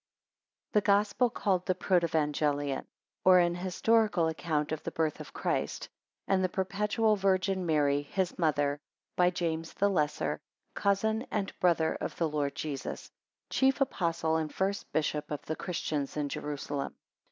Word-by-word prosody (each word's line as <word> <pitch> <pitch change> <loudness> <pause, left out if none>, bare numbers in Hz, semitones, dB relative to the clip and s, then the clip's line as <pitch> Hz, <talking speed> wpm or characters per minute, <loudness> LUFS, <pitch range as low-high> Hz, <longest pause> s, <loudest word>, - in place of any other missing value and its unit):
] - - -63
THE 210 - +5
GOSPEL 205 +4 +3
CALLED 185 -4 0
THE 185 - +2
PROTEVANGELION; 150 -6 +1 0.4
Or, 185 -1 +7
an 175 -1 +4
Historical 185 +1 +2
Account 155 -2 -1
of 155 - -2
the - - -4
BIRTH 160 -2 -1
of - - -9
CHRIST, - - -2 0.4
and 190 -1 +2
the 185 - +2
perpetual 210 +4 +1
VIRGIN 190 -1 +1
MARY, 145 -2 +3
his 180 +5 -2
Mother, 145 -3 +1 0.4
by 180 0 +4
JAMES 165 -2 -3
THE 200 0 +2
LESSER, 150 -5 0 0.3
Cousin 220 +4 +1
and 200 -2 -2
Brother 165 -3 +2
of - - -3
the 165 - +1
Lord 145 -2 -1
Jesus, 145 -3 -5 0.4
chief 265 +1 +3
Apostle 165 - +1
and 155 -1 -2
first 195 +2 -2
Bishop 150 -1 -1
of 150 -1 -5
the 160 - -2
Christians 155 -6 -3
in 145 -1 -1
Jerusalem. 145 -1 -4
170 Hz, 150 wpm, -30 LUFS, 150-195 Hz, 0.4 s, Or